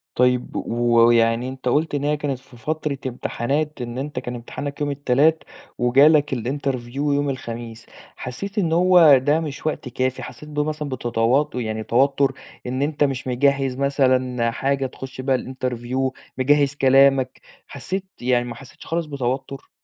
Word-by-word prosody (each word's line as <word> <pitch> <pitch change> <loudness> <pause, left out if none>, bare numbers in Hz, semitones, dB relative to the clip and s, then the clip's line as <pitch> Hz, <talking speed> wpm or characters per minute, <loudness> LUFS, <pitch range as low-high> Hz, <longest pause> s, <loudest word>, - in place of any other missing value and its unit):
طيب 125 0 +1
و 120 0 +1
ويعني 115 +1 +3
أنت 130 -1 -7
قُلت 150 +4 +1
إن 140 - -2
هي 150 +1 +1
كانت 140 -3 -3
في 130 -2 -18
فترة 150 +3 -3
امتحانات 135 +4 -2
إن 120 0 -5
أنت 145 +3 -4
كان 125 - -6
امتحانك 140 +5 -6
يوم 145 -1 0
التلات 145 +3 +2 0.3
وجالك 140 +4 +4
الinterview 130 0 -3
يوم 145 0 +1
الخميس، 115 -3 -6 0.3
حسّيت 195 - -7
إن 170 -6 +1
هو 170 -4 +7
ده 145 +4 +2
مش 155 -3 -6
وقت 150 -4 -2
كافي 130 +1 -2
حسّيت 140 +5 -10
ب 150 -1 -4
مثلًا 150 0 -2
بتتو 120 +2 +1
يعني 110 -3 -3
توتر 135 +3 +2 0.3
إن 130 +2 -2
أنت 145 +1 +1
مش 135 -2 -1
مجهّز 135 +1 +1
مثلًا 130 -3 +1
حاجة 135 +3 -1
تخش 130 0 -7
بها 130 0 +1
الinterview، 130 0 -3 0.3
مجهّز 140 +1 +3
كلامك 135 -1 +4 0.3
حسّيت 185 +7 -5 0.2
يعني 120 0 +1
ما 120 -1 -6
حسّيتش 130 +1 -14
خالص 165 0 -2
بتوتر؟ 135 -1 -4
135 Hz, 155 wpm, -22 LUFS, 125-145 Hz, 0.3 s, هو